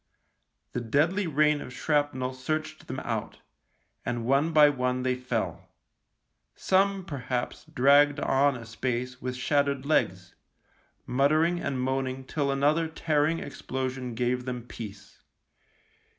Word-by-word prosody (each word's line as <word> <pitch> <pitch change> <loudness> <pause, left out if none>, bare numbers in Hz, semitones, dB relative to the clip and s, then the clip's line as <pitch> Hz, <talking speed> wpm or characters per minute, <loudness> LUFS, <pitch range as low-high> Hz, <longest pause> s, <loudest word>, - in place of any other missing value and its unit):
The 125 - -3
deadly 160 - +1
rain 150 -1 +3
of - - -8
shrapnel 145 -3 0
searched 155 +4 -4
them 130 - -4
out, 115 -3 -4 0.7
and 120 -1 -2
one 140 +6 +2
by 150 -2 +7
one 125 -2 0
they 130 0 +2
fell. 125 -3 -3 0.9
Some, 195 0 +2
perhaps, 125 -5 -4
dragged 145 +3 +5
on 140 -1 +2
a 115 - -9
space 125 +2 -3
with 125 0 -3
shattered 140 +1 0
legs, 95 -11 0 0.7
muttering 155 +7 +2
and 135 -6 -2
moaning 130 0 -1
till 140 +1 -2
another 150 +4 +2
tearing 160 0 +1
explosion 130 -3 -4
gave 125 +1 0
them 125 -2 -4
peace. 105 -4 -10
135 Hz, 120 wpm, -28 LUFS, 125-150 Hz, 0.9 s, by